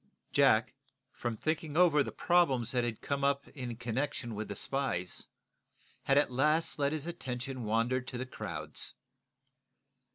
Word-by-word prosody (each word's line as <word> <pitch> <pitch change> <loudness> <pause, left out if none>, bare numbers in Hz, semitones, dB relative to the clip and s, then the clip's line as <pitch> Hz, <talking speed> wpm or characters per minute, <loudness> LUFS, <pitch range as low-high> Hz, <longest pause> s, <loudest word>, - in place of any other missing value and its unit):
Jack, - - +4 0.4
from 120 -2 -3
thinking 155 +1 -2
over 170 -5 +6
the - - -2
problems 135 -10 +2
that 125 -1 +1
had 115 -2 -3
come 140 -1 -2
up 140 0 +1
in 125 -4 -5
connection 120 +1 -2
with 110 +1 -4
the 100 - -5
spies, 115 -8 -2 0.8
had 135 - +4
at 145 -2 +4
last 150 +6 +2
let 140 0 +2
his 155 -1 -2
attention 130 -6 -4
wander 115 +4 +1
to 125 0 -6
the 125 - -3
crowds. 130 - -5
130 Hz, 150 wpm, -32 LUFS, 120-145 Hz, 0.8 s, over